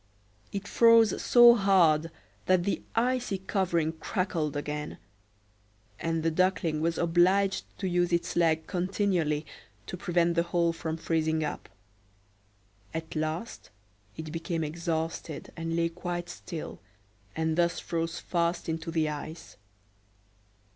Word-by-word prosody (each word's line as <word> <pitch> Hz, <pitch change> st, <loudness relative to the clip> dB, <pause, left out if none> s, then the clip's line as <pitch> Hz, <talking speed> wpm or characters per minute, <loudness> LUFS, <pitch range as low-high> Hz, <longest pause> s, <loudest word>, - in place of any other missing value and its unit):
It 200 Hz, 0 st, -5 dB
froze 230 Hz, -2 st, +5 dB
so 240 Hz, -1 st, +8 dB
hard 175 Hz, -7 st, +3 dB, 0.4 s
that 185 Hz, -1 st, +4 dB
the 200 Hz, -, -1 dB
icy 245 Hz, -3 st, +1 dB
covering 180 Hz, -4 st, 0 dB
crackled 160 Hz, -3 st, -2 dB
again; 150 Hz, +1 st, -4 dB, 1.0 s
and 165 Hz, -1 st, -1 dB
the 165 Hz, -, +2 dB
Duckling 170 Hz, -3 st, +1 dB
was 165 Hz, +1 st, 0 dB
obliged 185 Hz, +4 st, +2 dB
to 190 Hz, -, -2 dB
use 175 Hz, 0 st, +1 dB
its 170 Hz, 0 st, 0 dB
legs 160 Hz, -2 st, +2 dB
continually 180 Hz, -5 st, 0 dB, 0.4 s
to 180 Hz, -, -6 dB
prevent 175 Hz, -1 st, +1 dB
the 170 Hz, -, +2 dB
hole 170 Hz, 0 st, +1 dB
from 160 Hz, -1 st, -4 dB
freezing 160 Hz, -1 st, 0 dB
up. 150 Hz, -, -5 dB, 1.3 s
At 160 Hz, 0 st, -5 dB
last 155 Hz, +8 st, -4 dB, 0.5 s
it 160 Hz, -1 st, -6 dB
became 165 Hz, 0 st, -3 dB
exhausted, 160 Hz, -1 st, -4 dB
and 165 Hz, 0 st, -3 dB
lay 170 Hz, 0 st, +1 dB
quite 175 Hz, 0 st, -5 dB
still, 170 Hz, -3 st, -7 dB, 0.6 s
and 160 Hz, 0 st, 0 dB
thus 170 Hz, 0 st, +1 dB
froze 165 Hz, 0 st, -3 dB
fast 170 Hz, -1 st, -1 dB
into 160 Hz, +1 st, -3 dB
the 160 Hz, -1 st, +1 dB
ice. 155 Hz, +2 st, -7 dB
170 Hz, 125 wpm, -28 LUFS, 160-185 Hz, 1.3 s, so